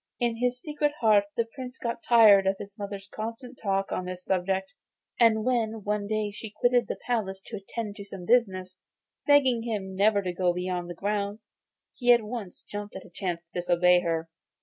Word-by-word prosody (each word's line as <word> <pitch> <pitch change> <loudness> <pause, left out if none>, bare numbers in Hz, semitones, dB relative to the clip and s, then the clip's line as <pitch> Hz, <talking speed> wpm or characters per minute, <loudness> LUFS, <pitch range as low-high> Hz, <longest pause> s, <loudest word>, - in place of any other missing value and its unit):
In 240 -2 0
his 250 +1 0
secret 295 +1 -1
heart 210 -3 +5
the 230 - +2
Prince 255 -2 -7
got 235 -1 -3
tired 210 -5 +6
of 195 - +3
his 200 0 -9
mother's 200 -2 -6
constant 230 +4 -6
talk 195 -1 0
on 185 - -2
this 180 0 -7
subject; 190 +2 -1 0.5
and 220 -2 +4
when 225 -4 0
one 205 0 -1
day 215 -1 -1
she 215 +2 -8
quitted 245 +3 +2
the - - -3
palace 210 -6 -1
to - - -6
attend 205 +1 -6
to 200 - -7
some 195 -2 -9
business, 185 -5 +1 0.5
begging 265 -5 +5
him 205 -5 -4
never 200 +1 +3
to 180 -1 -2
go 180 0 +1
beyond 180 0 -3
the 175 - -6
grounds, 205 +2 -2 0.5
he 245 -1 +3
at 240 -2 +5
once 215 -4 -7
jumped 205 0 -7
at - - -7
the - - -16
chance 175 -4 -3
of 170 0 -52
disobeying 180 0 +3
her. 165 -1 -1
205 Hz, 195 wpm, -27 LUFS, 190-235 Hz, 0.5 s, tired